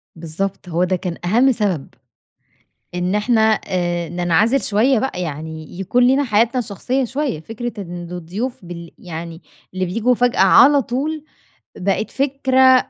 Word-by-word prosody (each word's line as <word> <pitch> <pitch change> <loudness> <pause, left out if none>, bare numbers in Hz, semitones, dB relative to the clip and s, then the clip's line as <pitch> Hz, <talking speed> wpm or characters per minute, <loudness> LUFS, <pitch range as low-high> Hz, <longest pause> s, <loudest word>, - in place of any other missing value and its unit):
بالضبط، 175 +4 -4
هو 170 +1 +1
ده 185 +1 +1
كان 180 -1 -4
أهَم 240 +9 +4
سبب 195 - -1 1.1
إن 180 +2 -1
إحنا 220 +2 +2 0.3
آآ 175 -2 -1
ننعزل 175 - +2
شوية 230 +5 +2
بقى 215 -7 -2
يعني 160 +1 -6
يكون 245 +6 +2
لينا 270 +3 +3
حياتنا 230 +1 +2
الشخصية 245 +4 -1
شوية، 260 - -2
فكرة 225 +7 -5
إن 175 -1 -8
الضيوف 185 +7 -5
بل 170 -1 -8
يعني 165 0 -8 0.3
اللي 185 0 -1
بييجوا 230 +7 +1
فجأة 245 -2 +1
على 275 +9 +6
طول 290 +6 -3 0.5
بقت 195 +3 -1
فكرة 260 -1 +3
200 Hz, 140 wpm, -19 LUFS, 175-250 Hz, 1.1 s, على